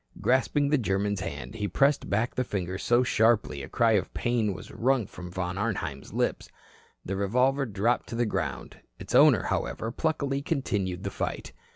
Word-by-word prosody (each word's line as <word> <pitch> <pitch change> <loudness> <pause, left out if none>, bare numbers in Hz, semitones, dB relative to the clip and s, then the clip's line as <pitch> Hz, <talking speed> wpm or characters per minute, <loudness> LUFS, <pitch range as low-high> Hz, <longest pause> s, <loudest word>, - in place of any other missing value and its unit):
Grasping 140 +3 +2
the 150 -1 +3
German's 100 -2 0
hand, - - -6
he 105 -2 -2
pressed 140 - +2
back 110 +4 0
the 130 - 0
fingers 95 -5 -3
so 120 +1 +3
sharply 110 - +2
a 70 - -8
cry 115 -1 +3
of 105 -4 +1
pain 120 -4 +1
was 90 - -8
wrung 125 -1 +1
from 90 -1 -9
Von 90 +1 -3
Arnheim's 90 -11 -3
lip. - - 0 0.6
The 95 - -2
revolver 125 +8 +1
dropped 110 +3 0
to - - -5
the 120 +1 +1
ground. 80 - -3 0.2
Its - - -8
owner, - - +6
however, 115 - -2
pluckily 140 -1 -1
continued 100 - -2
the - - -3
fight. - - -4
110 Hz, 175 wpm, -27 LUFS, 95-125 Hz, 0.6 s, owner